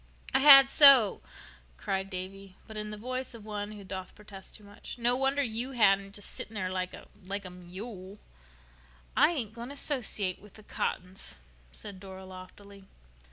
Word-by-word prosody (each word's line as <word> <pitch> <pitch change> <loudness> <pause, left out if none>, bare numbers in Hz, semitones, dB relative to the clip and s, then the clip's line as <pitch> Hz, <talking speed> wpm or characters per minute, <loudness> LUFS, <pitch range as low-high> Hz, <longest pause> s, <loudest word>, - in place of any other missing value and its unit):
"I - - +2
had 275 -1 +10
so," 270 -7 +8 0.6
cried 190 - -4
Davy, 190 0 -9
but 220 - -13
in 210 0 -6
the 210 - -8
voice 255 +3 -6
of 220 -2 -14
one 210 0 -7
who 205 -1 -12
doth 185 -1 -9
protest 200 -2 -14
too 210 - -13
much. 205 +5 -12
"No 240 +1 +1
wonder 270 +2 -1
you 240 +2 -4
hadn't—just 200 -3 0
sitting 225 - -7
there 185 -3 -4
like 185 -1 -5
a—like 200 +2 -10
a 185 - -10
mule." 185 +2 -11 1.0
"I - - +4
ain't 245 -11 -5
going 235 +2 -10
to, 285 - -10
'sociate 220 -10 -2
with 210 0 -19
the 215 - -16
Cottons," 185 - -6 0.3
said 200 - -12
Dora 190 -1 -12
loftily. 190 +2 -14
205 Hz, 165 wpm, -28 LUFS, 190-235 Hz, 1.0 s, had